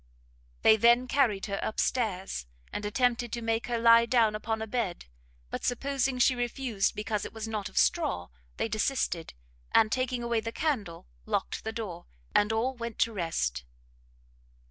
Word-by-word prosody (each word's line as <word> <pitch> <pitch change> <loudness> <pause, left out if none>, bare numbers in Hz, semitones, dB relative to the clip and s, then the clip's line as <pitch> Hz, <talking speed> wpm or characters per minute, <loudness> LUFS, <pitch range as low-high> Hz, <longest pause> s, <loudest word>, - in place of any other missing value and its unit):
They 220 - +7
then 235 +3 +5
carried 235 -7 +2
her 200 -1 -3
up 220 - -3
stairs, 190 - -1 0.3
and 205 - -3
attempted 240 +1 +1
to 235 - -2
make 225 0 0
her 240 -1 0
lie 230 0 +6
down 230 -3 +3
upon 220 +1 -2
a 220 - -3
bed; 220 -5 -3 0.5
but - - -4
supposing 270 +1 0
she 250 +1 +4
refused 245 -3 -1
because 210 0 -2
it - - -7
was 220 0 -5
not 210 -2 -3
of - - -14
straw, 305 - +2 0.3
they - - 0
desisted; 215 - -1 0.4
and, 220 -1 +4
taking 255 -1 -1
away 235 -1 +1
the 225 +1 -4
candle, 225 - -2 0.2
locked - - -2
the 220 - -3
door, 205 -7 -6 0.3
and 210 +1 +3
all 230 +4 0
went 235 -2 -6
to 230 - +2
rest. 165 - -1
225 Hz, 165 wpm, -29 LUFS, 210-245 Hz, 0.5 s, They